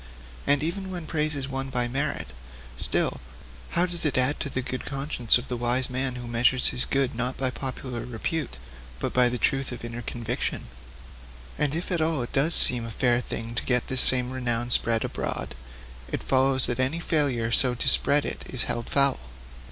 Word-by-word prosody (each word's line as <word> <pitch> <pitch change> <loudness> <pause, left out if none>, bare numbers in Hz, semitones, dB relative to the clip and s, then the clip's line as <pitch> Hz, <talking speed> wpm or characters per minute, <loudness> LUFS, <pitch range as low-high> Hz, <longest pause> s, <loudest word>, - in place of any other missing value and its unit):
And 145 +1 +4
even 190 +4 -3
when 175 -3 -5
praise 155 -1 -1
is 135 -1 -3
won 135 0 -4
by 125 -2 -1
merit, 135 - -2 0.4
still, 65 - -1 0.6
how 175 - +4
does 175 -1 -1
it 150 -4 0
add 130 +3 +2
to 140 - -3
the 130 -1 -3
good 130 0 -5
conscience 135 -4 +2
of 125 - -8
the 125 - -3
wise 120 +2 -1
man 130 0 -2
who 120 -1 -7
measures 120 +2 +3
his 125 - +1
good 135 -1 0
not 125 +2 -2
by 130 -1 -1
popular 130 -1 -6
repute, 125 - -4 0.4
but - - -3
by 125 -1 +4
the 125 - -3
truth 135 +1 0
of 120 -1 -7
inner 120 +1 -6
conviction? 120 0 -3 0.9
And 150 0 0
if 170 +3 -3
at 175 -3 +1
all 155 -5 +1
it 120 - -8
does 150 +4 +3
seem 120 -2 +6
a 115 - -6
fair 120 +1 +2
thing 115 -1 -5
to 115 - -1
get 125 -2 +1
this 130 -1 +5
same 125 -1 +4
renown 120 -2 -1
spread 115 -1 +3
abroad, - - -4 0.6
it - - -3
follows 130 0 +3
that 120 - -3
any 130 +6 0
failure 140 -9 0
so 125 0 +3
to - - -3
spread 145 +1 +3
it - - -4
is 130 - +1
held 120 0 -4
foul. 140 -1 +2
130 Hz, 200 wpm, -26 LUFS, 120-140 Hz, 0.9 s, seem